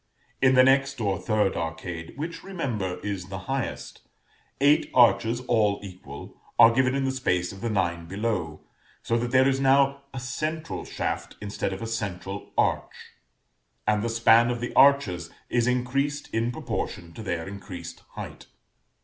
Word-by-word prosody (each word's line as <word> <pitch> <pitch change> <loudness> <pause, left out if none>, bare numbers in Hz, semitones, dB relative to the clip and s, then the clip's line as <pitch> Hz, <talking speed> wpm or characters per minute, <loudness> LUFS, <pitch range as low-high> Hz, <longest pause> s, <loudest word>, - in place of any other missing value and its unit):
In 130 -1 +5
the 130 - +8
next 135 +1 +3
or 100 -5 0
third 105 -4 +1
arcade, 80 0 -5
which, 165 +3 -5
remember, 120 - -3
is 100 -3 -3
the 95 0 -6
highest, 135 0 -4 0.6
eight 145 +2 +4
arches, 115 0 +4
all 110 -5 +2
equal, 90 -2 -10 0.2
are 115 - +9
given 130 +1 +2
in 140 - 0
the 135 - +1
space 90 -10 0
of 95 - -11
the 115 - -1
nine 85 -5 -1
below, 95 -6 -2 0.4
so 115 - 0
that 120 +1 -2
there 130 +2 +5
is 135 -1 +1
now 140 +1 +3
a 135 - -5
central 155 +6 -4
shaft - - -3
instead 100 -1 -3
of 95 +3 -5
a - - -3
central 100 -3 -4
arch, - - -1 0.7
and 105 -1 +2
the 115 - -1
span 115 +1 +5
of 120 -1 -2
the 120 - -4
arches 105 - +4 0.2
is 120 0 +2
increased 135 +4 -1
in 115 +2 +1
proportion 85 -7 -4
to - - -8
their 85 -5 -3
increased 100 -2 -8
height. - - -8
115 Hz, 160 wpm, -26 LUFS, 95-130 Hz, 0.7 s, are